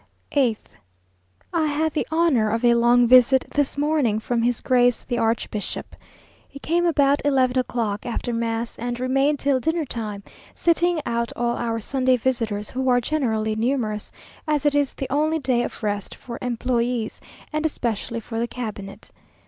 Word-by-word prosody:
8th. 250 -7 +1 0.9
I 320 -2 +2
had 305 +1 0
the - - -1
honour 315 -10 +3
of 225 +3 0
a 240 - +6
long 240 +1 +4
visit 255 +2 +6
this 290 -1 0
morning 290 -7 +1
from 235 +1 -1
his 240 0 +1
grace 245 -2 +2
the 240 -2 -2
archbishop. 225 -2 -2 0.5
He 280 - -11
came 345 +4 0
about 285 -3 +3
eleven 260 -3 +2
o'clock, 230 -5 -2
after 240 0 -3
mass, 230 0 -2
and 240 +1 -3
remained 270 +3 +2
till 275 -1 +1
dinner 320 +3 0
time, 215 -5 -5 0.3
sitting 340 -1 +2
out 235 0 -1
all 240 0 0
our 230 -1 -2
Sunday 255 +2 +1
visitors, 225 -4 -2
who 260 0 -1
are 245 0 +4
generally 225 -6 -1
numerous, 220 -3 -1 0.4
as 300 -1 0
it 290 - +3
is 285 -2 +1
the 270 - -4
only 310 +3 +2
day 255 -5 +1
of 240 - -5
rest 205 -2 -2
for 235 -1 -8
employés, 240 -1 -1 0.3
and 305 0 -1
especially 235 -6 -2
for 225 +1 -5
the 235 - 0
cabinet. 210 -5 -7
245 Hz, 165 wpm, -23 LUFS, 230-280 Hz, 0.9 s, a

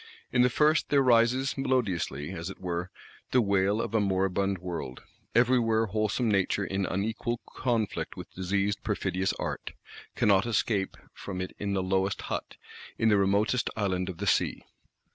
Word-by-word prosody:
In 125 - +3
the 125 - +5
first 150 +5 +2
there 140 -1 +4
rises 125 +2 +3
melodiously, 95 - -1
as 85 -1 -5
it 95 - -9
were, 90 0 -3 0.4
the 125 - +3
wail 100 -1 +2
of 115 - -3
a 110 - +3
moribund 95 0 +1
world: 85 -8 -6 0.3
everywhere 120 -2 +3
wholesome 110 +3 0
Nature 100 -1 +1
in 95 0 -1
unequal 110 +4 -2
conflict 115 -5 -2
with - - -9
diseased 100 +2 -1
perfidious 95 +1 -1
Art; - - -5 0.4
cannot 100 +1 +3
escape 105 -3 0 0.2
from 95 -2 -6
it 90 0 -5
in 100 -1 -2
the 95 -1 0
lowest 95 +1 0
hut, - - -5 0.4
in 115 - +3
the 105 - +5
remotest 100 +5 +2
island 95 -3 0
of 90 - -6
the - - -4
sea. - - +1
100 Hz, 160 wpm, -28 LUFS, 95-115 Hz, 0.4 s, the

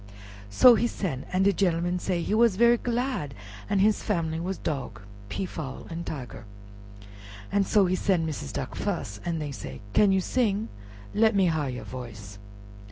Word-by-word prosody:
So 245 - +8
he 235 +1 +2
sen', 150 - -4
an' 185 +1 +2
de 200 +1 +4
genelman 175 -1 +1
say 175 -2 -1
he - - -1
was 225 -2 +4
very 235 +3 +5
glad 240 - -2 0.3
an' 200 - +1
his 210 +2 +3
family 165 -6 -1
was 185 +3 -3
Dog, 125 -8 -4 0.3
Peafowl, 155 - -5
and 165 +1 -4
Tiger. 125 -6 -6 1.2
So 200 0 +3
he 180 - 0
sen' 180 -3 +1
Missis 145 - -4
Duck - - -4
fus, 100 0 -3
an' 170 -1 -1
dey 150 -2 -4
said, 130 - -7
"Can 205 -2 +5
you 190 - +3
sing? 215 0 0 0.4
let 220 0 +3
me 195 -1 +4
har 160 -5 0
you 125 -1 -5
voice." 105 -6 -9
175 Hz, 165 wpm, -27 LUFS, 145-205 Hz, 1.2 s, So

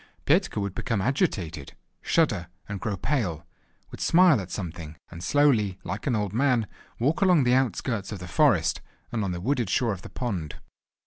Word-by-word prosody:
Petka - - +2
would 100 -2 -2
become 115 +1 -2
agitated, 95 - -1 0.3
shudder, 105 - +1 0.2
and 100 -1 -5
grow 100 -1 -3
pale, 105 - -1 0.5
would - - -9
smile 170 - +5
at 95 - -8
something, 85 -5 -6 0.2
and 85 0 -8
slowly, 110 -5 +3
like 100 +7 -5
an 125 - +2
old 105 -2 -2
man, 125 -2 +2 0.3
walk 145 - 0
along 180 -7 +5
the 125 0 +3
outskirts 115 -4 0
of 105 - -4
the 90 0 -8
forest, - - +2 0.3
and 110 -3 -1
on 95 - -1
the 85 - -4
wooded 120 +1 0
shore 115 +3 +1
of 95 - -8
the - - -10
pond. 95 - -4
105 Hz, 180 wpm, -26 LUFS, 90-130 Hz, 0.5 s, smile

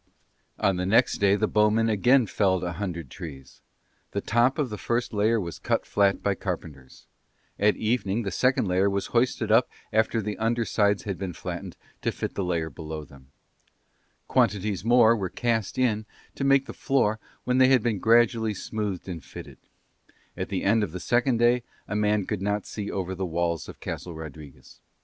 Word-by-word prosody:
On 95 -2 +1
the 90 - -1
next 115 +5 +3
day 100 0 +4
the 110 - +1
bowmen 105 +2 +3
again 120 +4 +4
felled 95 -3 +1
a 90 - -2
hundred 85 -2 -5
trees; 70 -7 -10 0.5
the - - 0
top 120 +5 +2
of 140 -7 -1
the 105 - -4
first 120 0 -1
layer 110 +2 +2
was 85 -4 -5
cut - - -1
flat 100 -1 +2
by 100 - +2
carpenters; 80 -9 -7 0.5
at 105 +1 +4
evening 110 -1 0
the 100 - -3
second 125 +4 +2
layer 95 +2 +2
was 100 0 -1
hoisted 120 -2 +1
up 115 +3 +5 0.2
after 110 +1 +2
their 105 -1 -2
under 115 +1 +1
sides 105 -2 +1
had 100 -3 -4
been 95 -2 -4
flattened - - -6 0.2
to - - 0
fit - - -4
the 100 - -2
layer 85 -3 -1
below 80 0 -7
them; 65 -1 -17 1.0
quantities 100 -1 +1
more 115 0 +5
were 95 -4 -3
cast 115 -2 -1
in 110 -4 +1 0.3
to - - -4
make 135 0 +4
the - - -8
floor 115 -5 +1 0.2
when 125 +1 +1
they 130 - +7
had 130 -4 +4
been 110 -5 0
gradually 115 0 +3
smoothed 100 -2 -4
and 85 -5 -6
fitted: - - -11 0.8
at - - -4
the - - -2
end 110 +3 +3
of 85 -6 -4
the 90 - -4
second 120 +4 +1
day 120 +1 +3 0.3
a 100 - -3
man 105 -1 +1
could 105 -1 -3
not 105 +1 -1
see 105 -1 -5
over 95 -1 -3
the 95 +1 -4
walls 85 -2 -2
of - - -11
Castle 85 -2 -6
Rodriguez. 75 -3 -11
105 Hz, 185 wpm, -26 LUFS, 90-115 Hz, 1.0 s, they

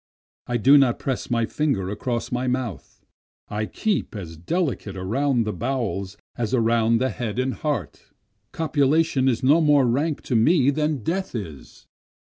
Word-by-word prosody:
I 120 - 0
do 135 +6 +6
not 130 -4 +3
press 130 -3 -3
my 115 -1 +1
fingers 110 -10 -1
across 120 +3 -3
my 125 +1 -1
mouth, 125 - -4 0.4
I 105 +1 -2
keep 210 - -2
as 85 -5 -7
delicate 115 - -2
around 120 +7 0
the 105 -1 -3
bowels 110 -6 -3 0.2
as 120 +1 -1
around 115 -1 +2
the 130 +2 0
head 115 -2 -4
and 130 +1 0
heart, 140 - -4 0.4
Copulation 150 -2 +1
is 130 0 +1
no 150 +6 +5
more 145 -3 +4
rank 140 +6 0
to 125 - -2
me 140 +4 +4
than 150 -3 -1
death 185 - -2
is. 80 - -8
125 Hz, 155 wpm, -23 LUFS, 110-145 Hz, 0.4 s, do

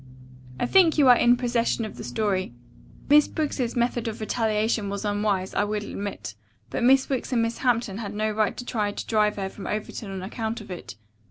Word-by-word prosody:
I - - +1
think 340 +2 +5
you 285 -3 +5
are 245 - +9
in 240 +1 +4
possession 240 -2 0
of 215 - -8
the - - -8
story. 195 - -1 0.5
Miss 295 +1 +6
Briggs's 280 -6 -2
method 240 -1 0
of 220 - -4
retaliation 215 -1 0
was 200 +1 -4
unwise, 205 -2 0
I - - +2
will 210 0 -2
admit, 200 - -5 0.4
but - - -2
Miss 265 +2 +5
Wicks 265 -1 -2
and 230 -2 +3
Miss 230 +1 -2
Hampton 230 -5 0
had 205 -2 -5
no 215 +1 0
right 215 -1 0
to 245 - -6
try 210 -4 -1
to - - -6
drive 210 -1 +2
her 195 -1 -3
from 195 +1 -8
Overton 210 0 -4
on 190 -1 -5
account 220 +3 -4
of 210 -3 -11
it. 175 - -8
220 Hz, 205 wpm, -25 LUFS, 205-240 Hz, 0.5 s, are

